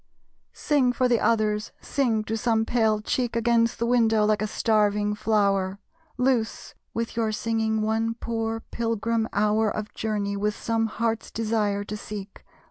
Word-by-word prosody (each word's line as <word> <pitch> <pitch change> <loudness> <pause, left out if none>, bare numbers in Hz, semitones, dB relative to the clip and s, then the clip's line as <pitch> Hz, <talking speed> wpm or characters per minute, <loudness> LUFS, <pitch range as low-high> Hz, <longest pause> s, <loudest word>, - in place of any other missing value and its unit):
Sing, 280 -5 +2
for 255 0 +1
the 240 -2 +3
others! 215 -1 +1
Sing; 235 -6 0
to 220 +1 -3
some 225 -1 +1
pale 220 -3 +2
cheek 240 +2 -1
Against 230 0 +2
the 235 - -1
window, 225 -3 +3
like 210 -1 +2
a 215 - 0
starving 210 -1 +1
flower. 200 -3 +1 0.4
Loose, 250 -3 0 0.2
with 230 0 -3
your 225 -2 0
singing, 220 0 0
one 225 +1 0
poor 225 -1 -3
pilgrim 230 0 -1
hour 215 +1 +2
Of 210 0 -5
journey, 205 -2 -2
with 210 +1 -1
some 225 -1 0
Heart's 225 0 -2
Desire 215 -2 0
to 210 - -6
seek. 210 -1 -8
220 Hz, 150 wpm, -25 LUFS, 210-230 Hz, 0.4 s, the